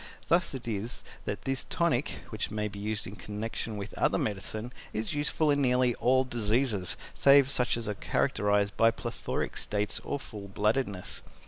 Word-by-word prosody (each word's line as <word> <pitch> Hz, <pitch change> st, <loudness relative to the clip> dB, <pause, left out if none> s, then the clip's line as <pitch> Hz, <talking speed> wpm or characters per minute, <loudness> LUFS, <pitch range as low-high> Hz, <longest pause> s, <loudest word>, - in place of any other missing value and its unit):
Thus 170 Hz, -4 st, +3 dB
it 125 Hz, -2 st, -7 dB
is 110 Hz, +1 st, -2 dB, 0.2 s
that -, -, -3 dB
this 135 Hz, 0 st, -1 dB
tonic 150 Hz, -6 st, +1 dB
(which 110 Hz, -, -2 dB
may 105 Hz, 0 st, -1 dB
be 100 Hz, -1 st, -8 dB
used 105 Hz, +1 st, -2 dB
in 100 Hz, -, -7 dB
connection 105 Hz, +1 st, -4 dB
with 100 Hz, -, -6 dB
other -, -, +3 dB
medicine) 110 Hz, +4 st, -3 dB, 0.2 s
is 110 Hz, 0 st, -2 dB
useful 150 Hz, +1 st, +2 dB
in 145 Hz, 0 st, +2 dB
nearly 125 Hz, -1 st, +3 dB
all 130 Hz, +1 st, +4 dB
diseases, 115 Hz, -4 st, 0 dB, 0.2 s
save 140 Hz, -1 st, +6 dB
such 125 Hz, -4 st, +2 dB
as 115 Hz, -2 st, -4 dB
are 105 Hz, -, 0 dB
characterized 100 Hz, 0 st, +1 dB
by 115 Hz, -, +6 dB
plethoric 115 Hz, -, -3 dB
states, 105 Hz, 0 st, -1 dB
or 145 Hz, -, -2 dB
full 105 Hz, -6 st, -8 dB
bloodedness. 105 Hz, -1 st, -1 dB
115 Hz, 165 wpm, -30 LUFS, 105-130 Hz, 0.2 s, save